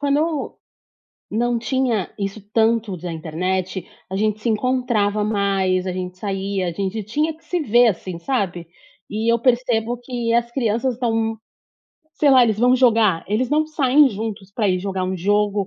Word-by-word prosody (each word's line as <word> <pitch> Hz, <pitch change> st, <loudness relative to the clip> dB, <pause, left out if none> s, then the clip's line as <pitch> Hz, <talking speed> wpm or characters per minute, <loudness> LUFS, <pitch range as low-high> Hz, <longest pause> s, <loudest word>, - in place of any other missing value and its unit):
quando 290 Hz, +2 st, 0 dB, 0.7 s
não 235 Hz, +2 st, 0 dB
tinha 235 Hz, -4 st, 0 dB
isso 200 Hz, +1 st, -4 dB
tanto 225 Hz, -3 st, +2 dB
da 175 Hz, 0 st, -6 dB
internet, 180 Hz, +3 st, -3 dB, 0.2 s
a 190 Hz, -, -3 dB
gente 215 Hz, +1 st, 0 dB
se 235 Hz, -, -2 dB
encontrava 225 Hz, -3 st, +1 dB
mais, 195 Hz, -3 st, +1 dB
a 185 Hz, -, -1 dB
gente 180 Hz, 0 st, -5 dB
saía, 195 Hz, -2 st, -2 dB
a -, -, -3 dB
gente 200 Hz, +4 st, -3 dB
tinha 305 Hz, +8 st, -1 dB
que 325 Hz, -, -28 dB
se 355 Hz, +2 st, -2 dB
ver, 240 Hz, -3 st, +4 dB
assim, 185 Hz, -3 st, -3 dB
sabe. 180 Hz, -6 st, -2 dB, 0.4 s
E 220 Hz, +2 st, 0 dB
eu 235 Hz, -, +3 dB
percebo 240 Hz, -1 st, +1 dB
que 240 Hz, -2 st, -2 dB
as 235 Hz, 0 st, +1 dB
crianças 235 Hz, 0 st, 0 dB
estão, 225 Hz, -2 st, -1 dB, 0.8 s
sei 290 Hz, -, +3 dB
lá, 255 Hz, -2 st, +7 dB
eles 220 Hz, -3 st, +1 dB
vão 250 Hz, +2 st, +4 dB
jogar, 225 Hz, -8 st, +3 dB
eles 230 Hz, +6 st, 0 dB
não 310 Hz, +1 st, +2 dB
saem 290 Hz, -2 st, +4 dB
juntos 210 Hz, -2 st, -6 dB
pra 210 Hz, -1 st, 0 dB
ir 185 Hz, -, +1 dB
jogar 190 Hz, 0 st, -3 dB
um 185 Hz, +1 st, -2 dB
jogo, 205 Hz, +2 st, +1 dB
220 Hz, 170 wpm, -21 LUFS, 195-245 Hz, 0.8 s, lá